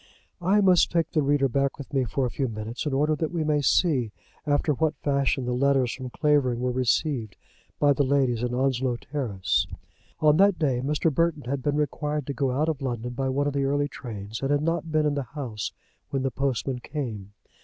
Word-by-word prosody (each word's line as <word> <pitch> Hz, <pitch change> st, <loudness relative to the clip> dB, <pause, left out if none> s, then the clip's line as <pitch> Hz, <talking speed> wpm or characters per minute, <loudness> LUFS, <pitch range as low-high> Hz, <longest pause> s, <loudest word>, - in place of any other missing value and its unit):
I 195 Hz, +4 st, +3 dB
must 185 Hz, -3 st, +4 dB
take 170 Hz, -1 st, +1 dB
the 155 Hz, -, +2 dB
reader 140 Hz, -1 st, +2 dB
back 140 Hz, +2 st, 0 dB
with 140 Hz, 0 st, -10 dB
me 135 Hz, -2 st, +2 dB
for 130 Hz, +4 st, -1 dB
a 125 Hz, -, -2 dB
few 135 Hz, -, -1 dB
minutes, 110 Hz, +5 st, -5 dB
in 145 Hz, -, -1 dB
order 150 Hz, +3 st, +2 dB
that 160 Hz, +1 st, -1 dB
we 170 Hz, -2 st, -1 dB
may 150 Hz, -1 st, +1 dB
see 135 Hz, -, +2 dB, 0.4 s
after 145 Hz, +1 st, +2 dB
what 155 Hz, +1 st, 0 dB
fashion 140 Hz, -2 st, +1 dB
the 125 Hz, -, -1 dB
letters 135 Hz, -1 st, +2 dB
from 130 Hz, -1 st, -6 dB
Clavering 135 Hz, -4 st, +2 dB
were 125 Hz, 0 st, 0 dB
received 125 Hz, -, 0 dB, 0.4 s
by 145 Hz, -1 st, +5 dB
the 140 Hz, -, 0 dB
ladies 130 Hz, -4 st, +1 dB
in 125 Hz, 0 st, -1 dB
Onslow 130 Hz, -1 st, +1 dB
Terrace. 120 Hz, -8 st, -1 dB, 0.5 s
On 150 Hz, -1 st, +4 dB
that 200 Hz, 0 st, +5 dB
day 135 Hz, -6 st, +1 dB
Mr. 150 Hz, +2 st, +1 dB
Burton 165 Hz, -2 st, +1 dB
had 135 Hz, +2 st, -3 dB
been 145 Hz, +2 st, 0 dB
required 150 Hz, 0 st, -1 dB
to 140 Hz, -, -3 dB
go 135 Hz, -1 st, 0 dB
out 140 Hz, +5 st, 0 dB
of 155 Hz, -4 st, -2 dB
London 125 Hz, -2 st, -3 dB
by 135 Hz, +2 st, -1 dB
one 140 Hz, +2 st, 0 dB
of 145 Hz, -, -1 dB
the 140 Hz, -1 st, 0 dB
early 145 Hz, +1 st, +1 dB
trains, 110 Hz, -6 st, -7 dB
and 135 Hz, -, -1 dB
had 145 Hz, 0 st, +2 dB
not 165 Hz, 0 st, -1 dB
been 155 Hz, -1 st, +2 dB
in 150 Hz, -, +2 dB
the 145 Hz, -, -1 dB
house 130 Hz, -6 st, -5 dB, 0.4 s
when 135 Hz, -1 st, -1 dB
the 135 Hz, -, 0 dB
postman 135 Hz, 0 st, -1 dB
came. 115 Hz, -8 st, -5 dB
140 Hz, 215 wpm, -26 LUFS, 125-150 Hz, 0.5 s, by